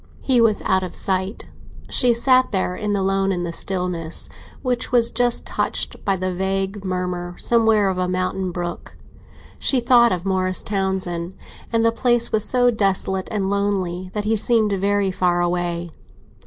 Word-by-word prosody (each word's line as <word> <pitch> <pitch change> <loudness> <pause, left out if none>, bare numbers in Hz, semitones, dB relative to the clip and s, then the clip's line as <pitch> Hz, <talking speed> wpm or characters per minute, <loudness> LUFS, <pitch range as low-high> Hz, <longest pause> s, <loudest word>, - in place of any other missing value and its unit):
He 255 -3 +3
was 220 -2 +2
out 190 0 +2
of 185 -1 -6
sight; 190 +1 -2 0.4
she 250 -2 +3
sat 255 +2 +3
there 185 -3 -1
alone, 195 -1 0
in 175 -2 -2
the 170 -1 -4
stillness, 180 -3 -2 0.3
which 250 -2 -1
was 235 -2 +3
just 240 0 +1
touched - - -2
by 195 - +1
the 185 0 -2
vague 195 +2 -2
murmur, 180 -1 -3
somewhere, 225 -3 +2
of 185 -1 -1
a 180 - 0
mountain 185 +1 -2
brook. 175 0 -6 0.6
She 265 - +2
thought 235 -1 +5
of 180 0 -2
Morris 185 -1 0
Townsend, 190 -3 -2 0.4
and 230 -1 +2
the 230 - +4
place 240 0 +1
was 215 -1 +3
so 245 +1 +4
desolate 190 -3 -1
and 200 -3 -2
lonely 190 -3 -1
that 210 - -1
he 220 +1 +2
seemed 220 0 +2
very 200 0 +1
far 180 -1 +1
away. 175 -1 -2
195 Hz, 160 wpm, -21 LUFS, 185-220 Hz, 0.6 s, thought